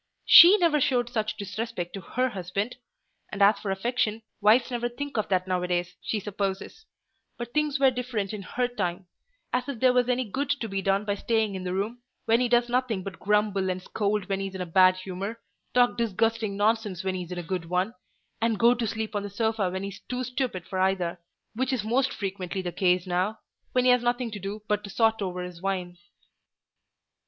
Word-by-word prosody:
She 365 +5 +10
never 330 -6 +3
showed 245 -2 +1
such 215 -2 -2
disrespect 200 -2 -4
to 195 - -6
her 255 +8 -1
husband: 200 +3 -3 0.5
and 200 - -5
as 200 +1 +5
for 210 - -5
affection, 220 +2 -1 0.2
wives 225 +5 +4
never 240 0 -1
think 285 +4 -6
of 215 - -1
that 185 -1 +1
now 185 -1 0
a 180 - -2
days, 175 0 -1
she 220 - -2
supposes: 200 - -4 0.5
but 240 0 -6
things 300 -1 +1
were 270 -1 +5
different 240 -5 -3
in 210 - -5
her 245 +6 -1
time—as 245 - -5
if 265 -5 -4
there 255 0 +4
was 250 0 +2
any 250 +1 +2
good 275 +7 -3
to 280 -5 -1
be 195 -2 -2
done 195 +2 +1
by 205 - 0
staying 220 0 0
in 190 -1 -5
the 180 - -2
room, 220 +5 -3 0.2
when 230 +1 +4
he 250 -1 +1
does 240 0 +3
nothing 245 -5 0
but 195 0 -7
grumble 205 -2 +1
and 185 0 -3
scold 205 -1 -1
when 195 -1 -1
he's 195 -1 -4
in 190 - -4
a - - -2
bad 185 +2 +5
humour, 190 +4 -5 0.4
talk 245 -1 +4
disgusting 225 -1 0
nonsense 210 -3 0
when 190 0 -1
he's 180 -1 -5
in 180 - -4
a 175 - -4
good 180 0 -3
one, 180 +6 -1 0.5
and 225 -1 +1
go 235 +3 +5
to 235 -2 -2
sleep 220 +1 -3
on 205 - 0
the 205 - -5
sofa 220 -1 0
when 190 +1 -4
he's 200 0 -6
too 250 0 -2
stupid 250 -8 -3
for 190 - -4
either; 185 -2 0 0.3
which 255 +3 -1
is 250 -6 -1
most 255 +5 +1
frequently 190 -2 -4
the 175 - -3
case 180 0 +2
now, 185 +4 -1 0.4
when 250 0 +2
he 250 - +7
has 250 -1 +4
nothing 240 0 -1
to 210 - -6
do 200 +2 -6
but 210 0 0
to 200 - -8
sot 225 +1 +2
over 180 -2 -3
his 180 -1 -9
wine." 185 -2 -2
210 Hz, 215 wpm, -27 LUFS, 190-240 Hz, 0.5 s, She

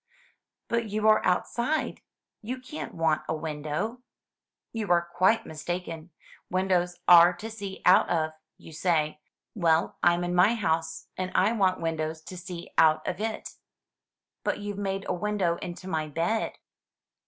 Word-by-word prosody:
"But 235 -2 -1
you 215 +1 0
are 215 - +5
outside; 240 +11 0 0.4
you 250 +4 -5
can't 255 +5 -7
want 160 -2 +2
a - - +1
window." 155 +9 -3 0.7
"You 220 -4 -3
are 170 0 +3
quite 190 +5 +3
mistaken. 165 +1 -5 0.4
Windows 180 -1 +1
are 175 0 +9
to 215 +6 -8
see 200 -3 -7
out 180 - +6
of, 160 -2 +1 0.3
you 160 - -13
say. 155 -2 0 0.3
Well, 165 -4 +1
I'm 175 0 +3
in 175 0 -2
my 180 +6 +5
house, 165 -6 -1
and 185 0 -3
I 200 +4 +4
want 190 -6 +1
windows 160 -1 -2
to 185 - -9
see 175 -1 -8
out 155 -1 +4
of - - -2
it." 220 0 -4 0.9
"But - - 0
you've 205 -1 -5
made 195 -1 -2
a - - 0
window 180 -2 0
into 180 +1 -7
my 160 -4 -1
bed." 170 +9 -1
180 Hz, 150 wpm, -27 LUFS, 165-205 Hz, 0.9 s, are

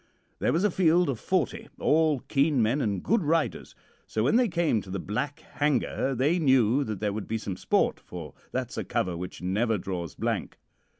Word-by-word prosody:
There - - +2
was 170 +4 +1
a 210 - +3
field 175 -2 +3
of 125 -5 -2
forty, 185 -3 -1
all 155 -3 +2
keen 140 0 +1
men 120 +6 +2
and 100 -6 -1
good 230 -1 +2
riders, 160 0 -1 0.3
so 110 - -1
when 135 - +3
they 245 0 +4
came 170 - +1
to 95 - -12
the 95 - -3
Black 125 +9 -3
Hanger 140 -2 0
they 145 +8 +2
knew 130 -3 +4
that 110 -5 -4
there 105 -1 -1
would 105 0 -5
be 115 - -1
some 100 -3 -4
sport, - - +1
for 85 -4 -9 0.2
that's - - -3
a - - -2
cover 90 -2 -1
which 90 +1 -7
never 105 +5 +1
draws 90 -4 -5
blank. - - -2
130 Hz, 195 wpm, -27 LUFS, 105-155 Hz, 0.3 s, they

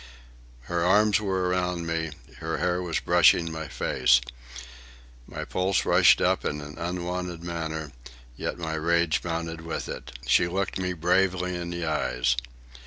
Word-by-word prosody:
Her 85 +6 -2
arms 105 +3 +4
were 95 -3 0
around 90 -1 -1
me, 80 -1 -2 0.3
her - - -3
hair 90 0 0
was 85 -2 -1
brushing 85 -1 +4
my 80 0 -5
face. 60 - +3 1.1
My - - -6
pulse 95 +1 0
rushed - - +6
up - - +2
in 75 - -2
an 75 0 -9
unwonted 90 0 -4
manner, 80 -3 -4 0.4
yet - - -4
my 80 -2 -4
rage 85 0 +1
mounted 80 -1 -3
with 80 0 -4
it. - - -7
She 85 - +4
looked 95 +2 -2
me 90 -1 -1
bravely 90 +1 +1
in 85 0 -4
the 85 -1 -3
eyes. 65 -5 +1
85 Hz, 150 wpm, -26 LUFS, 80-90 Hz, 1.1 s, rushed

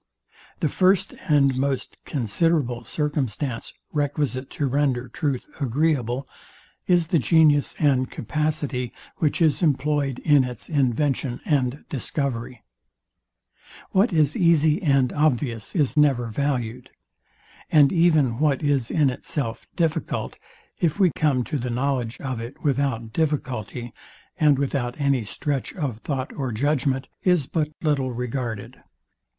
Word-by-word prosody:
The - - +3
first 185 0 +2 0.2
and 140 -3 +4
most 135 0 -2
considerable 130 +1 0
circumstance 140 -4 -2 0.2
requisite 145 -3 -1
to 145 - -2
render 135 -2 0
truth 130 +1 -2
agreeable, 135 -2 0 0.6
is 175 -3 +3
the 170 - +3
genius 150 -1 +4
and 130 -4 +2
capacity, 145 -2 -2 0.2
which 160 +2 +1
is 155 -3 +2
employed 145 -3 +1
in 145 -3 +5
its 125 -3 -7
invention 135 -2 0
and 140 -2 0
discovery. 130 -3 -3 1.3
What 200 +4 +3
is 155 -4 +2
easy 165 0 +3
and 135 -6 +2
obvious 130 -7 0
is 150 -6 +1
never 140 -5 +3
valued; 125 -1 -2 0.8
and 150 -1 +6
even 155 -9 +3
what 150 -2 +1
is 140 -5 +1
in 145 -4 +3
itself 125 -2 -4
difficult, 165 -3 -1 0.4
if 170 +3 0
we 185 -4 +5
come 140 -5 +2
to 145 +3 -3
the 125 +1 -3
knowledge 125 -1 -1
of 130 -4 -4
it 120 +4 -9
without 135 -6 0
difficulty, 125 -6 -2 0.5
and 150 -3 +5
without 135 -2 -2
any 140 -4 +2
stretch 135 +5 -3
of 140 - -3
thought 135 0 -3
or 135 -4 -3
judgment, 135 +2 0
is 180 -6 +2
but 150 +1 -1
little 140 -4 +1
regarded. 120 -3 -4
140 Hz, 125 wpm, -24 LUFS, 125-150 Hz, 1.3 s, and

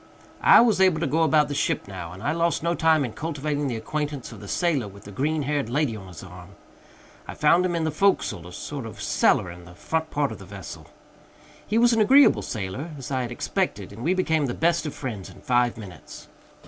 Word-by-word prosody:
I - - +8
was 225 -5 +3
able 185 -4 +4
to 165 - 0
go 160 +4 +1
about 155 -2 +4
the 145 - -4
ship 145 - -1
now, 90 -4 -7
and 95 +3 -10
I 145 - +1
lost 170 0 0
no 170 0 +1
time 160 -4 +3
in 115 - -6
cultivating 150 -2 -3
the 125 - -2
acquaintance 145 +4 -4
of - - -10
the - - -10
sailor 155 - 0
with 100 0 -13
the 100 - -11
green 150 +8 -1
haired 140 -3 -1
lady 135 -2 0
on 95 -3 -10
his 90 -1 -11
arm. 90 +1 -12 0.7
I - - -7
found 170 +4 +4
him 175 - -2
in 165 - -1
the 160 - 0
forecastle 150 - +1
a - - -11
sort 135 +5 -6
of 110 - -11
cellar 90 - +2
in 90 0 -12
the 90 +1 -14
front 160 - -2
part 145 -1 0
of - - -8
the 95 - -11
vessel. 95 -3 -10 0.8
He 215 - 0
was 240 +1 +5
an 225 - +3
agreeable 270 +6 +6
sailor, 105 - -5
as 135 0 -8
I 130 -1 0
had 120 -1 -4
expected, 140 - -2
and 110 - -10
we 180 +4 +2
became 160 -5 +1
the 120 - -3
best 170 -1 +1
of 150 - -6
friends 110 -9 -6
in - - -14
five 120 -3 +1
minutes. 95 -8 -11
145 Hz, 235 wpm, -25 LUFS, 105-160 Hz, 0.8 s, I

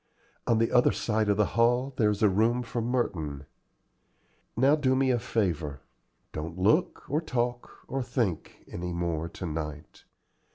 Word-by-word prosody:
On 115 - +3
the 115 0 +1
other 125 - +5
side 110 -2 0
of 100 - +3
the 105 - +4
hall 120 +3 +2
there 110 -5 +3
is 105 +1 -1
a - - +7
room 115 +5 +2
for 120 0 -3
Merton. 85 - -2 1.1
Now 135 +5 +5
do 130 -4 +2
me 130 0 +3
a 120 - +1
favor: 85 -12 -1 0.5
don't 80 +3 -5
look, 110 - +2
or 150 +2 0
talk, 120 -5 -2 0.2
or 135 - -2
think, 120 - -2
any 90 0 -5
more 85 -1 -2
to 95 - -7
night. 75 -2 -6
110 Hz, 160 wpm, -28 LUFS, 85-125 Hz, 1.1 s, a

